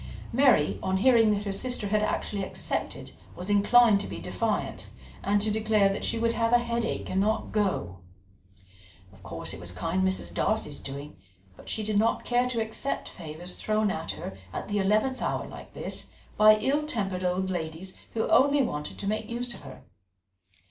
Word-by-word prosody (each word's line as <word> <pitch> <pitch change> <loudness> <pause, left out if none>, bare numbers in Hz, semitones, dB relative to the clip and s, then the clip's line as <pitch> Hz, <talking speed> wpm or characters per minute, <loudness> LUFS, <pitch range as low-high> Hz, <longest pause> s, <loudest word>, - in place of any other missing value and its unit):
Mary, 255 - +4
on 190 0 0
hearing 230 +1 +5
that 205 -1 +1
her 200 - -2
sister 225 0 -1
had 210 +1 +2
actually 205 -1 -1
accepted, - - -3 0.2
was 180 +3 -4
inclined 205 +1 +6
to - - -4
be - - -6
defiant, - - -2 0.3
and 205 +1 +2
to 215 +1 +2
declare 215 -2 +3
that 195 - -3
she - - 0
would 230 0 +2
have 230 0 0
a - - +8
headache 235 -1 -2
and 190 - +1
not 215 +2 0
go; 185 - -1 1.1
of 95 - -18
course - - -5
it - - -8
was 90 0 -4
kind 165 - -1
Mrs. 190 0 0
Darcy's 215 -9 0
doing, 140 +2 -8 0.4
but - - -12
she 220 - -2
did 210 -1 +1
not 225 +2 +1
care 245 +1 +2
to 235 -2 -1
accept 220 +5 -2
favours 170 +1 -7
thrown 215 -1 +1
at 160 -2 -3
her 95 - -7 0.2
at - - -5
the 205 0 0
eleventh 215 +7 +1
hour - - -1
like - - -11
this, - - -5 0.3
by 215 0 +8
ill 280 +7 +1
tempered 195 -9 -2
old 185 +1 0
ladies 170 +2 -4 0.2
who 225 - +1
only 280 +1 +5
wanted 150 -10 -4
to - - -5
make 215 +1 -2
use 240 +1 -2
of - - -10
her. 135 -2 -11
210 Hz, 185 wpm, -28 LUFS, 185-230 Hz, 1.1 s, a